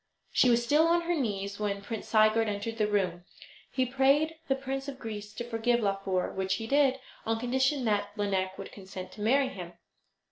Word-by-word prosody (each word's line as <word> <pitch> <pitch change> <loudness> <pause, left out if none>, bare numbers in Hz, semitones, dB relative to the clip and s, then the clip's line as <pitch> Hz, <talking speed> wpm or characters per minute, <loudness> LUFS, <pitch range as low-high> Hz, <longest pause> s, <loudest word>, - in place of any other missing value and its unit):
She 250 - +4
was 235 0 +4
still 300 +6 +4
on 340 +1 +3
her 345 +1 -1
knees 200 - -2
when 200 -1 -2
Prince 220 +1 -5
Sigurd 215 0 +4
entered 210 +3 -4
the 210 - +3
room. 185 -4 0 0.5
He 260 - +1
prayed 275 +5 +3
the 270 - +2
Prince 270 +1 -4
of 275 -2 -6
Greece 210 -4 -6
to 240 - -4
forgive 240 0 +1
Laufer, 195 -2 0
which 190 0 0
he 225 - -5
did, 270 +1 +3 0.2
on 225 0 -1
condition 260 +2 +1
that 205 -2 +1
Lineik 190 -2 -1
would 195 - -8
consent 190 -2 -9
to 210 - -10
marry 265 +5 +3
him. 180 -7 -8
225 Hz, 190 wpm, -29 LUFS, 200-265 Hz, 0.5 s, She